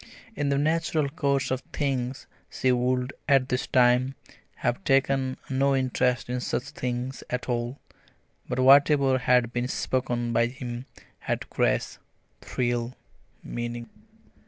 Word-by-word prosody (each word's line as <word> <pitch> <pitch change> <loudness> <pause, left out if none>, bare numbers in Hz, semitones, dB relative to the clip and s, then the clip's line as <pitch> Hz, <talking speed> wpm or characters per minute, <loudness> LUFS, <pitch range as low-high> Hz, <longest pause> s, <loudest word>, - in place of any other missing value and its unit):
In 145 -1 -1
the 140 - +2
natural 155 0 +1
course 140 -4 0
of 130 0 -1
things 135 -3 -2 0.2
she 130 - +1
would, 125 +1 0 0.2
at 135 -2 +4
this 125 0 -1
time, 125 +1 +3 0.4
have 120 - -2
taken 135 -1 +2
no 135 +1 +2
interest 125 -1 +1
in 125 0 -2
such 125 - -1
things 130 -4 -4
at 125 0 -3
all, 120 +1 -2 0.7
but - - -2
whatever 135 0 +5
had 125 -1 +2
been 120 0 -1
spoken 120 -2 -1
by 115 +1 +3
him 125 0 -7 0.3
had - - -3
grace, - - 0 0.4
thrill, 120 0 -2 0.5
meaning. 120 0 -5
130 Hz, 130 wpm, -26 LUFS, 125-135 Hz, 0.7 s, whatever